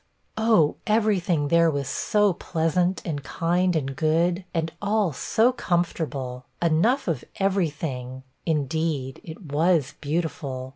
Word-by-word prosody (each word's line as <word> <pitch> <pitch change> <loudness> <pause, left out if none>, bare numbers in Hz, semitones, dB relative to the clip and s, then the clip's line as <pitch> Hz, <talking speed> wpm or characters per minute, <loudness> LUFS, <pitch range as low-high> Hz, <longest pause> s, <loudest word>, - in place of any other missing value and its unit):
'Oh, 220 -9 +3
every 215 -2 +3
thing 160 -5 0
there 170 +1 +5
was 140 -3 -2
so 205 -2 +2
pleasant, 175 +3 0
and 145 -4 -3
kind, 175 +3 0
and 135 -3 -1
good, 170 +4 +1
and 165 -2 -1
all 205 -4 +1
so 225 - +2
comfortable; 155 - -2
enough 205 - +2
of 155 -8 -1
every 195 -3 +1
thing; 130 -4 -6 0.2
indeed, 150 -3 -1
it 160 +3 -9
was 155 -2 +2
beautiful!' 145 -4 -3
165 Hz, 130 wpm, -25 LUFS, 145-185 Hz, 0.2 s, there